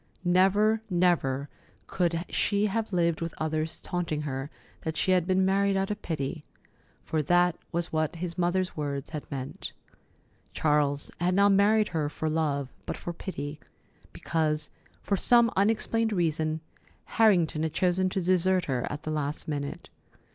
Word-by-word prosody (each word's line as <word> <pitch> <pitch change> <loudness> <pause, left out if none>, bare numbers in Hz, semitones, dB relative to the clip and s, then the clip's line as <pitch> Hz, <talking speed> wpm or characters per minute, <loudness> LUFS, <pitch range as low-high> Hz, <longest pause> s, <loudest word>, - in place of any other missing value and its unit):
Never, 200 +5 +4
never 170 -7 +1 0.4
could 170 -1 -1
she 205 0 +1
have 215 +1 -1
lived 170 -3 +1
with 165 -1 -4
others 155 0 -1
taunting 170 -4 -2
her 135 -1 -4 0.3
that 160 0 -4
she 185 - +1
had 180 -2 +3
been 185 0 +3
married 195 +1 +2
out 195 +1 0
of 210 - -4
pity—for 155 0 -5
that 175 +3 +3 0.2
was 170 0 -2
what 155 +1 0
his 170 0 -4
mother's 180 +1 0
words 140 -2 -4
had 150 -2 -6
meant. 135 -2 -6 0.8
Charles 145 -2 +1
had 180 +1 +1
not 200 +1 +5
married 210 +2 +4
her 155 -4 -1
for 155 +1 -3
love, 145 -4 -1
but - - -3
for 175 - -5
pity, 150 -4 -6 0.5
because, 155 -2 -1 0.3
for 200 - 0
some 235 +2 +5
unexplained 225 +2 +1
reason, 160 -3 0 0.4
Harrington 180 -9 +3
had 160 -1 -1
chosen 185 +2 +2
to 190 - -2
desert 185 +1 +2
her 125 -3 -1
at 145 - -6
the 155 - -3
last 150 0 -3
minute. 145 -2 -4
170 Hz, 150 wpm, -28 LUFS, 155-190 Hz, 0.8 s, not